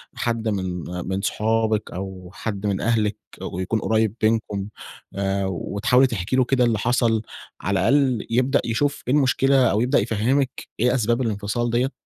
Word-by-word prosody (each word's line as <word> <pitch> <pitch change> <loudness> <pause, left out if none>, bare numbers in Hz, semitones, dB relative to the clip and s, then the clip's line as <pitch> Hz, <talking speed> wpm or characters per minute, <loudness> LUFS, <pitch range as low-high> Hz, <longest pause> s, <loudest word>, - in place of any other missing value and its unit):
حد 115 -1 -2
من 95 -4 -2 0.2
من 95 +1 -2
صُحابِك 110 +1 0
أو 95 -1 -7
حد 100 0 -4
من 100 -2 0
أهلِك 110 -3 +1 0.2
ويكون 95 +5 -2
قُريّب 110 -1 +1
بينكم؟ 110 -3 0 0.5
آآ 100 0 -1
وتحاولي 100 +8 +2
تحكي 100 +2 -2
له 130 - +4
كده 130 0 +2
اللي 115 -2 +2
حصل 115 -1 +2 0.4
على 95 0 0
الأقل 130 +2 +2
يبدأ 130 +4 +2
يشوف 140 +5 -1
إيه 125 - +2
المشكلة 135 -2 +3
أو 105 - +1
يبدأ 125 +3 +3
يفهمِك 125 +5 0
إيه 125 +2 +3
أسباب 120 0 +1
الإنفصال 110 +1 -1
ديّة. 125 +4 +1
110 Hz, 155 wpm, -23 LUFS, 100-125 Hz, 0.5 s, له